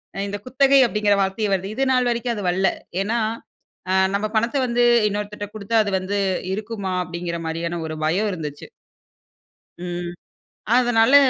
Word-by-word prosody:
ஆ - - -7
இந்த 205 +1 -4
குத்தகை 270 +2 +4
அப்படிங்கிற 210 -2 +2
வார்த்தையே 195 +2 0
வருது. 195 +2 -2
இது 270 - +1
நாள் 250 -1 +3
வரைக்கும் 235 0 -1
அது 205 - -5
வரல்ல. 190 +2 +2 0.4
ஏன்னா, 230 +3 0 0.7
ஆ 185 - +2 0.2
நம்ம 205 - 0
பணத்த 235 +5 +1
வந்து 240 0 +2 0.3
இன்னொருத்தர்ட்ட 205 0 -4
குடுத்தா 215 +2 -3
அது 200 - -2
வந்து 190 +2 -2 0.4
இருக்குமா? 205 -3 -4
அப்படிங்கிற 170 0 -4
மாரியான 170 +1 -3
ஒரு 155 - -5
பயம் 190 +7 +1
இருந்துச்சு. 150 -4 -7 1.1
ம். 175 0 -4 0.6
அதனால 245 +1 +4
205 Hz, 150 wpm, -22 LUFS, 180-230 Hz, 1.1 s, குத்தகை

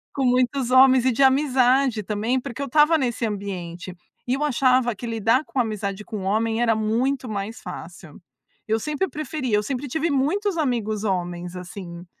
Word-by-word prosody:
Com 275 - 0
muitos 250 +1 +1
homens 260 -1 +6
e 260 - +4
de 235 - -1
amizade 265 -3 +3
também, 215 +5 -1
porque 255 +1 -7
eu 280 - -2
estava 300 +4 +4
nesse 245 -4 -1
ambiente. 185 -4 -5 0.3
E 250 - 0
eu 295 +2 -1
achava 255 -3 +2
que 240 - -8
lidar 230 +4 +1
com 270 - -4
amizade 210 -3 -2
com 215 - -6
um - - -6
homem 225 +4 0
era 230 -1 +3
muito 240 +5 0
mais 215 +2 -5
fácil. 170 -2 -9 0.5
Eu 220 +1 0
sempre 300 - -2
preferia, 275 -6 -2
eu - - +2
sempre 265 +4 -4
tive 320 +5 -1
muitos 340 +8 0
amigos 225 -8 -1
homens, 175 -2 -3
assim, 180 -1 -9
240 Hz, 175 wpm, -23 LUFS, 210-270 Hz, 0.5 s, homens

